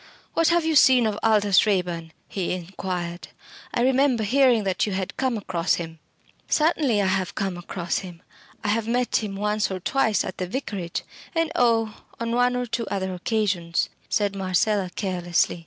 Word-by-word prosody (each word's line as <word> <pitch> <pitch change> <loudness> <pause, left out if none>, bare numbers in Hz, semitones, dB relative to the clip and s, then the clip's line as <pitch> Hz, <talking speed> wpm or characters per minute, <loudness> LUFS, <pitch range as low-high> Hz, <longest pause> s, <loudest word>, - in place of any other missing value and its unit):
"What 330 - +3
have 340 -1 +3
you 320 -1 +1
seen 260 -4 +6
of 215 -1 -1
Aldous 210 -2 +4
Raeburn?" 175 -5 -1 0.2
he 185 -3 -2
inquired. 180 -1 -5 0.4
"I - - 0
remember 260 -2 +3
hearing 245 0 +4
that 190 +1 0
you 205 - -2
had 190 +1 -3
come 260 -3 0
across 185 -4 0
him." 165 -1 -7 0.5
"Certainly 300 -9 +2
I - - +1
have 185 -1 0
come 195 -3 -2
across 175 0 -3
him. 175 -3 -10 0.4
I 210 - -1
have 220 +1 0
met 245 +1 +1
him 210 -3 -3
once 210 +1 0
or 190 -1 -3
twice 220 +2 +1
at 185 - -7
the 185 - -2
Vicarage 195 -6 -4 0.3
and 330 -1 +1
oh! 230 -7 +1 0.2
on 230 0 -2
one 245 +1 +2
or 250 0 -1
two 235 -1 -3
other 190 -1 -2
occasions," 180 -3 0 0.2
said 205 -1 +1
Marcella, 195 +1 +1
carelessly. 175 -3 0
205 Hz, 170 wpm, -24 LUFS, 185-235 Hz, 0.5 s, seen